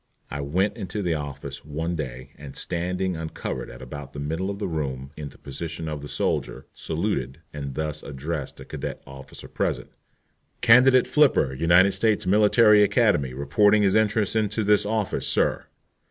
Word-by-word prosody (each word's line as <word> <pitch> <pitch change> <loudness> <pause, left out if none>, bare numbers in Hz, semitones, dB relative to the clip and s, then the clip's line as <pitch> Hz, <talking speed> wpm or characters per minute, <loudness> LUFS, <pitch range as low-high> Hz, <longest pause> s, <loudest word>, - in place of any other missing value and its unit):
I 70 0 -3
went 95 +10 0
into 105 0 -4
the 85 -2 +1
office 70 -2 -6
one 80 +4 -3
day, 65 -3 -6
and 70 -2 -11
standing 90 +1 -2
uncovered 80 -6 -5
at - - -10
about 70 +2 -8
the 70 - -7
middle 80 +7 -2
of 100 - -4
the 105 - -3
room, 70 -5 -4
in 75 -2 -6
the - - -18
position 80 +3 -6
of 75 -2 -4
the 75 - -7
soldier, - - -2
saluted 65 +5 -3
and 70 -3 -6
thus 75 -1 -3
addressed 70 +1 -5
a - - -9
cadet - - -6
officer 65 0 -10
present: - - -2 0.7
"Candidate 125 +2 +6
Flipper, 140 - +3
United 85 +7 +4
States 105 +1 +1
Military 105 +2 +5
Academy, 100 - +2
reports 100 +10 +3
his 100 -2 +3
entrance 110 -1 +2
into 110 0 0
this 105 0 +3
office, 110 -2 -1
sir." - - +1
85 Hz, 165 wpm, -25 LUFS, 70-105 Hz, 0.7 s, Candidate